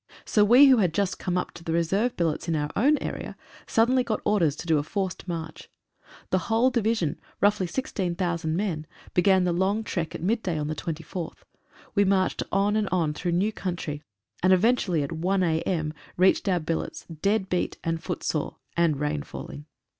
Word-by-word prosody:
So 210 - +3
we 245 +7 +8
who 265 -2 +7
had 180 -7 +1
just 200 -2 0
come 180 -1 -1
up 180 - -2
to 170 - -12
the 165 - -3
reserve 195 +9 +1
billets 170 0 -1
in 165 - +1
our 150 -1 -1
own 290 +7 +4
area - - -5 0.3
suddenly 250 +3 +3
got 225 -3 -1
orders 175 -9 +2
to - - -8
do 160 -3 +3
a - - -2
forced 190 +3 -3
march. 165 -2 -6 0.6
The 185 - +3
whole 230 +4 +3
Division, 220 - 0 0.2
roughly 205 -2 +2
16,000 175 -6 -2
men, 170 -5 -2 0.3
began 190 +1 +4
the 180 -1 +1
long 195 +5 +1
trek 170 -6 -3
at - - -6
mid 220 +5 +1
day 175 -6 -2
on 150 - -2
the - - -1
24th. 165 +2 -6 0.5
We 205 - +4
marched 190 -1 +1
on 200 +2 +2
and 215 -2 +1
on 165 -4 +1
through 175 +3 -2
new 195 +5 +2
country, 170 -7 -4 0.4
and 185 - +4
eventually 185 -5 +3
at 140 - -5
1 185 +4 0
a.m., 160 -1 0 0.2
reached 190 +2 +3
our 180 -2 +2
billets, 165 0 -3
dead 195 +5 -1
beat 180 -1 -1
and 165 -1 -1
foot 175 0 -4
sore, 155 - -2 0.2
and 165 -4 +2
rain 150 - -1
falling. 70 +1 -9
180 Hz, 190 wpm, -26 LUFS, 165-205 Hz, 0.6 s, we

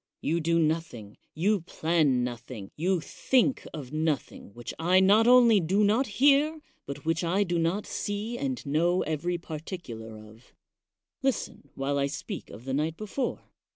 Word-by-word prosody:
You 165 +3 0
do 165 +1 +2
nothing, 155 -10 -1 0.2
you 195 +5 +2
plan 155 -6 +1
nothing, 120 -4 -6
you 180 +2 0
think 260 - +1
of 145 -4 -8
nothing 155 -8 -2
which 120 0 -7
I 180 +3 +4
not 205 +4 +5
only 240 -4 +7
do 190 +5 +2
not 225 +6 +3
hear, 290 +3 +4 0.3
but 140 +1 -7
which 165 +2 0
I 185 +4 +2
do 175 -3 -1
not 170 +5 0
see 205 +3 -3
and 260 - -3
know 170 +5 +2
every 165 +3 -2
particular 150 - -7
of. 110 +2 -16 0.7
Listen 265 - -2
while 140 +1 -1
I 140 - +1
speak 155 +7 -6
of 115 - -11
the 135 - -3
night 155 +3 -1
before. 215 +5 -3
165 Hz, 155 wpm, -28 LUFS, 140-205 Hz, 0.7 s, only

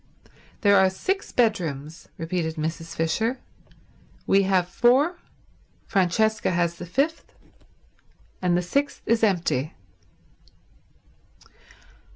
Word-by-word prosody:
"There 200 -2 +5
are 190 0 +5
six 385 - -3
bedrooms," 165 - -1
repeated 165 -1 -2
Mrs. 160 +1 -4
Fisher. 220 +10 0 0.9
"We 195 - +4
have 185 -2 +2
four, 265 - +2 0.7
Francesca 215 +3 +1
has 170 -1 0
the 175 - -8
fifth, 280 - -2 1.1
and 180 -1 +2
the 180 - 0
sixth 280 +11 -1
is 230 0 +1
empty." 170 -8 0
185 Hz, 95 wpm, -24 LUFS, 165-225 Hz, 1.1 s, There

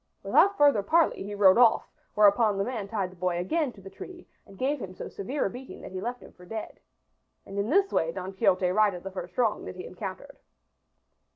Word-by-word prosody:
Without 400 +1 +4
further 285 -8 +5
parley 325 +11 +2
he 205 +1 -5
rode 200 +1 +6
off, 235 -2 +5 0.3
whereupon 210 0 +4
the 195 - +1
man 220 -3 -4
tied 195 -3 -3
the - - -16
boy 180 0 -1
again 275 - -1
to 200 - -16
the 195 - -10
tree 360 -2 -11 0.2
and 195 - -15
gave 270 +3 -1
him 185 -2 -7
so - - -7
severe 260 +9 -3
a - - 0
beating 255 +2 -10
that - - -9
he 185 0 -5
left 245 +3 -4
him - - -14
for 180 - -18
dead. 215 +4 -7 0.7
And 195 +1 -6
in 200 +3 -1
this 390 +5 +2
way 165 - +1
Don 185 +2 -6
Quixote 190 -1 +2
righted 200 -3 +2
the 195 - -6
first 180 -1 -8
wrong 230 -4 +1
that - - -7
he 180 - -8
encountered. 195 +10 -8
200 Hz, 220 wpm, -27 LUFS, 185-250 Hz, 0.7 s, rode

